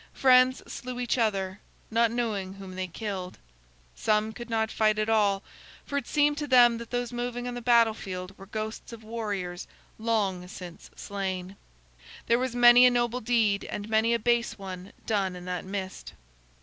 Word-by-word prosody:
Friends 255 0 +5
slew 250 0 -6
each 245 0 0
other, 195 -4 0 0.3
not 230 +1 +3
knowing 215 -5 -2
whom 195 -1 -9
they 185 0 -3
killed. 185 -1 -5 0.6
Some 215 - 0
could 240 +2 -9
not 220 -1 0
fight 215 -1 +2
at 215 +1 0
all, 205 -3 +2 0.4
for 280 - -5
it 280 -3 -1
seemed 295 0 +2
to 295 - -3
them 240 -3 +6
that 235 - -8
those 245 0 -2
moving 245 0 -3
on 245 - -4
the 245 - -5
battle 230 -2 +5
field 185 -2 -7
were 195 - -13
ghosts 215 +2 -5
of 225 -1 -10
warriors 205 -6 -4 0.3
long 205 -5 0
since 180 -2 -10
slain. 190 -1 -4 0.7
There 235 +1 +3
was 255 -1 -2
many 245 +1 +8
a - - +6
noble 240 0 0
deed 220 -3 +2
and 205 0 -5
many 220 +1 +3
a - - +2
base 235 0 +1
one 190 -1 -8
done 195 -4 0
in 180 0 -9
that 180 -1 -4
mist. 190 -1 -6
220 Hz, 175 wpm, -28 LUFS, 195-240 Hz, 0.7 s, many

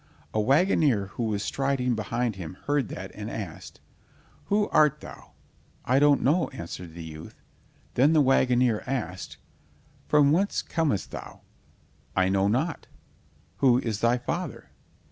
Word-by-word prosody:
A 110 - +1
wagoner 140 - +3
who - - -5
was 105 -2 -1
striding 135 -2 0
behind 115 +1 -2
him 90 -2 -7
heard 145 -4 +1
that - - -7
and - - -6
asked: - - -7 0.6
"Who 205 +1 +1
art 150 -1 +4
thou?" - - -12 0.5
"I 130 +2 +3
don't 145 -1 +4
know," 160 +7 +3
answered 85 0 -8
the 85 - -7
youth. 80 0 -10 0.5
Then 140 +6 +4
the 155 - +5
wagoner 125 -4 +3
asked: 110 -9 -4 0.7
"From 145 -1 +4
whence 195 +6 +1
comest 145 - -1
thou?" - - -9 0.7
"I 95 0 +3
know 95 +1 +2
not." 135 +10 -1 0.7
"Who 125 -3 +4
is 115 -5 -2
thy 120 +2 +3
father?" 165 +7 -5
125 Hz, 140 wpm, -26 LUFS, 105-145 Hz, 0.7 s, the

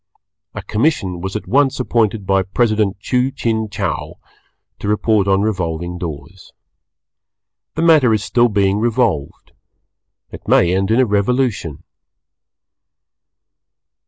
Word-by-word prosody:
A - - -6
commission 105 - -1
was 95 +2 -5
at 105 - -4
once 135 0 +2
appointed 110 -4 0
by 95 0 +2
President 105 0 0
Chu 125 +5 0
Chin 110 -4 -2
Chow 100 -5 -4 0.6
to - - -5
report 105 -1 +1
on 95 +1 +2
Revolving 85 -4 -3
Doors. 85 +3 -8 1.2
The 160 - -1
matter 155 -8 +5
is 110 -2 +1
still 120 +1 +2
being 100 -1 +1
revolved. 110 - -1 0.8
It - - -11
may 90 +1 +3
end 95 +1 0
in 115 +3 +2
a 130 - +4
Revolution. 105 - -1
105 Hz, 120 wpm, -18 LUFS, 95-120 Hz, 1.2 s, matter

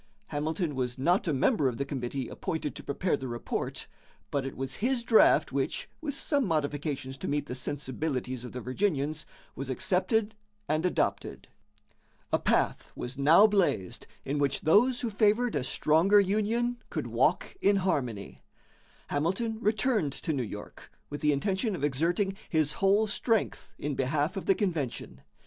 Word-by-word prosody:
Hamilton 155 +2 -2
was 125 -1 -2
not 175 +8 +2
a - - +2
member 145 - +2
of 120 -3 -2
the 140 - -1
committee 135 -2 -4
appointed 160 -5 -4
to - - -9
prepare 170 +5 0
the 135 -2 -6
report, 120 -1 -4 0.5
but 140 -1 -1
it - - -8
was 135 0 -3
his 245 +1 0
draft 230 -2 +5
which, - - -2
with 290 -3 -3
some 285 -1 +1
modifications 145 - -2
to - - -5
meet 145 0 -1
the 125 - -6
sensibilities 130 -1 -3
of 125 - -7
the 125 - -6
Virginians, 150 +1 -1 0.3
was 135 0 -5
accepted 195 - +1 0.3
and 155 +4 +1
adopted. - - -2 0.8
A - - +4
path - - 0
was 125 +3 -6
now 160 +9 +7
blazed 190 - 0 0.2
in 145 +2 -1
which 140 -1 +1
those 240 +10 +4
who 235 - -2
favored 215 +3 +2
a 140 - 0
stronger 160 +9 +4
union 215 +5 +1
could - - -3
walk - - +1
in 200 - +4
harmony. 125 - -2 0.7
Hamilton 190 +10 -1
returned 215 - +1
to 160 - -3
New 135 - -1
York 105 -3 -8 0.2
with 145 - -5
the 150 - +3
intention 190 - 0
of 145 - -6
exerting 170 +8 +1
his 155 -2 +2
whole 200 +3 +3
strength 220 +1 -1
in 145 0 -3
behalf 145 +6 0
of 195 - -5
the 195 - +5
convention. 150 - -3
155 Hz, 160 wpm, -29 LUFS, 135-205 Hz, 0.8 s, now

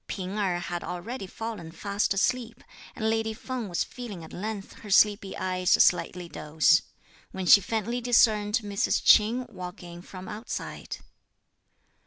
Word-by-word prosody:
P'ing 190 0 -5
Erh 185 -4 +1
had 175 0 -4
already 195 +4 -5
fallen 215 -5 -6
fast 200 +4 -1
asleep; 230 +4 0 0.3
and 220 - -2
lady 220 0 0
Feng 250 -2 -5
was 175 - 0
feeling 220 -9 -8
at 160 - -12
length 205 +1 -5
her 210 - -11
sleepy 200 0 +3
eyes 185 -1 -1
slightly 180 0 +3
dose, 155 0 +3 0.5
when 190 -1 -5
she 200 - +8
faintly 225 +4 -2
discerned 215 -3 +3
Mrs. 200 -1 0
Ch'in 235 +4 +5
walk 180 -1 -8
in 175 0 -10
from 185 +1 -10
outside. 220 +3 -6
200 Hz, 145 wpm, -27 LUFS, 180-220 Hz, 0.5 s, she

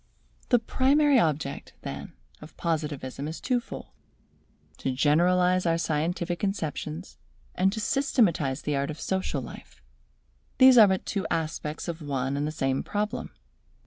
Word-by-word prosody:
The 245 - +6
primary 275 +4 +3
object, 150 -6 -1
then, 70 +1 -6 0.3
of 150 +1 -13
Positivism 150 -4 -3
is 160 - -6
two 250 -1 +1
fold: 235 - -8 0.9
to 135 - -1
generalize 180 +6 +3
our 165 0 +2
scientific 170 +2 -1
conceptions, 170 -3 -4 0.3
and 190 +1 +2
to 220 - -4
systematize 200 - +1
the 150 - -1
art 140 0 -1
of 155 - -6
social 190 0 -2
life. - - -11 0.8
These 260 -1 +8
are 215 - +9
but 190 -1 0
two 200 -2 -2
aspects 155 0 -3
of 170 -1 -4
one 135 -2 -2
and 145 +1 -1
the - - -2
same 135 -3 -1
problem. 210 +1 -3
165 Hz, 145 wpm, -27 LUFS, 150-195 Hz, 0.9 s, are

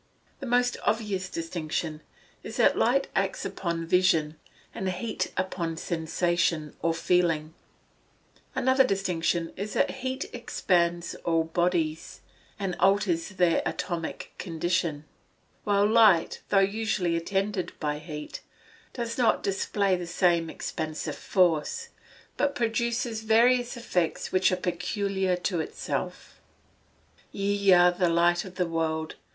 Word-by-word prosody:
_ - - -38
The 270 - -6
most 245 0 +2
obvious 205 -4 -1
distinction 165 -2 -3 0.4
is, - - -8
that - - +4
light - - +2
acts - - -1
upon 170 -2 -3
vision, 165 -3 +2 0.4
and 190 - -2
heat 190 +5 -3
upon 175 -3 -2
sensation, 165 -2 -1
or 165 0 +1
feeling. 165 -3 +1 1.0
Another 260 +1 +4
distinction 180 -6 -1
is, 200 +1 -5
that - - +1
heat 260 +1 -2
expands 170 -2 0
all 165 -1 +2
bodies, 165 -1 -1 0.4
and 195 -4 -2
alters 190 -3 +2
their 180 -4 +2
atomic 170 -3 -4
condition; 165 -3 -1 0.6
while 205 0 +3
light, 215 -5 +4
though 200 - +3
usually 195 -3 +1
attended 195 +1 -1
by 150 -1 -2
heat, 150 -1 -7 0.5
does 235 0 -4
not 230 -3 +3
display 195 0 +1
the 175 -1 -5
same 170 -2 +2
expansive 155 -1 -4
force, 180 - +1 0.5
but 285 -1 +1
produces 235 -1 -1
various 240 +3 +3
effects 180 -8 -1
which 185 0 +3
are - - +2
peculiar 185 +1 -1
to 180 0 -2
itself. 160 - -5 0.8
[Verse: - - -29
"Ye 200 0 +2
are 175 0 +6
the 180 0 +1
light 175 +1 +3
of 185 -1 -10
the 180 - +1
world. 160 -1 -2
180 Hz, 125 wpm, -27 LUFS, 165-205 Hz, 1.0 s, are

